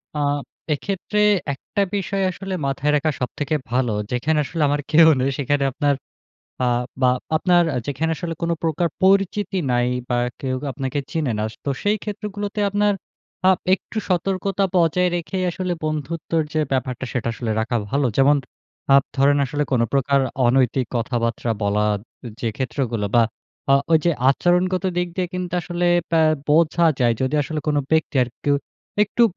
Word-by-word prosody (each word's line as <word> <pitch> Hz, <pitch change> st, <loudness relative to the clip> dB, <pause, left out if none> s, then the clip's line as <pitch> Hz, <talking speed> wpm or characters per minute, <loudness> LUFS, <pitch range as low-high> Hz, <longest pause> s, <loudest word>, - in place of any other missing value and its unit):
আ -, -, -1 dB, 0.5 s
এক্ষেত্রে 195 Hz, +6 st, -2 dB, 0.3 s
একটা 200 Hz, +9 st, -3 dB
বিষয় 195 Hz, 0 st, -1 dB
আসলে 195 Hz, +1 st, -6 dB
মাথায় 135 Hz, +2 st, 0 dB
রাখা 155 Hz, +2 st, +1 dB
সবথেকে 145 Hz, +4 st, -2 dB, 0.2 s
ভালো। 125 Hz, -2 st, +1 dB, 0.2 s
যেখানে 150 Hz, +6 st, +1 dB
আসলে 160 Hz, +3 st, -4 dB
আমার 145 Hz, 0 st, 0 dB
কেউ 160 Hz, +1 st, +7 dB
নেই 130 Hz, +2 st, +1 dB
সেখানে 140 Hz, +1 st, +1 dB
আপনার 145 Hz, +1 st, +1 dB, 0.7 s
আ -, -, +2 dB, 0.4 s
বা 125 Hz, -, +6 dB, 0.3 s
আপনার 175 Hz, +1 st, +4 dB
আ -, -, -1 dB
যেখানে 150 Hz, +4 st, -1 dB
আসলে 165 Hz, +1 st, -4 dB
কোন 170 Hz, -, 0 dB
প্রকার 165 Hz, +1 st, +1 dB
পরিচিতি 195 Hz, 0 st, +2 dB
নাই 120 Hz, 0 st, +2 dB, 0.2 s
বা 120 Hz, -, +1 dB, 0.2 s
কেউ 130 Hz, -1 st, -2 dB, 0.2 s
আপনাকে 135 Hz, 0 st, -3 dB
চিনে 150 Hz, -7 st, -1 dB
না। 105 Hz, -, 0 dB, 0.2 s
তো 140 Hz, -, -1 dB
সেই 205 Hz, +1 st, +2 dB
ক্ষেত্রগুলোতে 210 Hz, 0 st, -4 dB
আপনার 205 Hz, +1 st, +2 dB, 0.6 s
আ -, -, +8 dB, 0.2 s
একটু 220 Hz, -, -7 dB
সতর্কতা 195 Hz, +2 st, 0 dB
বজায় 180 Hz, +2 st, +3 dB
রেখেই 185 Hz, +2 st, -3 dB
আসলে 180 Hz, +1 st, -3 dB
বন্ধুত্বর 160 Hz, +2 st, -2 dB
যে 155 Hz, -, +1 dB
ব্যাপারটা, 130 Hz, -1 st, -1 dB
সেটা 120 Hz, -3 st, -2 dB
আসলে 115 Hz, 0 st, -4 dB
রাখা 120 Hz, +2 st, -1 dB
ভালো। 140 Hz, -1 st, +1 dB
যেমন 140 Hz, +2 st, +5 dB, 0.6 s
আপ 140 Hz, -, +4 dB
ধরেন 140 Hz, +1 st, +4 dB
আসলে 145 Hz, +3 st, -2 dB
কোন 125 Hz, -, +3 dB
প্রকার 140 Hz, 0 st, +2 dB, 0.3 s
অনৈতিক 130 Hz, 0 st, +2 dB
কথাবার্তা 115 Hz, 0 st, -1 dB
বলা 105 Hz, +1 st, +1 dB
উ -, -, -7 dB, 0.4 s
যে 115 Hz, -, 0 dB
ক্ষেত্রগুলো 120 Hz, -4 st, -2 dB
বা 120 Hz, -, +6 dB, 0.5 s
আ -, -, +8 dB, 0.2 s
ওইযে 160 Hz, +2 st, +4 dB, 0.2 s
আচরণগত 180 Hz, +5 st, +1 dB
দিক 180 Hz, 0 st, 0 dB
দিয়ে 185 Hz, -1 st, 0 dB
কিন্তু 180 Hz, -1 st, -4 dB
আসলে 175 Hz, +1 st, -2 dB, 0.2 s
ব্যা 165 Hz, -1 st, +4 dB, 0.3 s
বোঝা 165 Hz, +2 st, +3 dB, 0.2 s
যায় 120 Hz, -2 st, +3 dB
যদি 130 Hz, +3 st, 0 dB
আসলে 155 Hz, +2 st, -4 dB
কোন 150 Hz, -, +1 dB
ব্যক্তি 160 Hz, -2 st, +1 dB
আর 125 Hz, -, -2 dB, 0.2 s
কেউ 145 Hz, 0 st, +3 dB, 0.5 s
একটু 235 Hz, -, 0 dB
150 Hz, 160 wpm, -22 LUFS, 130-180 Hz, 0.7 s, আ